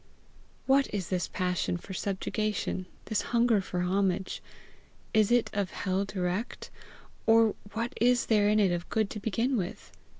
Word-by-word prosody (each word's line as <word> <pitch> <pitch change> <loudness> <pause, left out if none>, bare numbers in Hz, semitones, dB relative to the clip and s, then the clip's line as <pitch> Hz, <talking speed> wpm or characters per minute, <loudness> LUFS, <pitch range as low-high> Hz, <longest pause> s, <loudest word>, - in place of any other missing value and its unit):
What 275 +1 +3
is 195 -5 -3
this 180 -2 0
passion 180 -1 -1
for 190 - -9
subjugation? 200 0 -2 0.2
this 220 - 0
hunger 235 -3 +2
for 180 -1 -3
homage? 190 +1 0 0.7
Is 215 0 +4
it 240 -1 +3
of 200 -2 0
hell 190 +1 -1
direct, 190 +3 -3 0.6
or 225 -1 +6 0.2
what 230 +4 -2
is 245 0 +4
there 210 -2 +3
in 215 +1 +4
it 195 -3 +4
of 175 0 -3
good 220 -2 0
to 210 - -5
begin 230 +5 0
with? 180 -3 -5
205 Hz, 155 wpm, -29 LUFS, 185-225 Hz, 0.7 s, or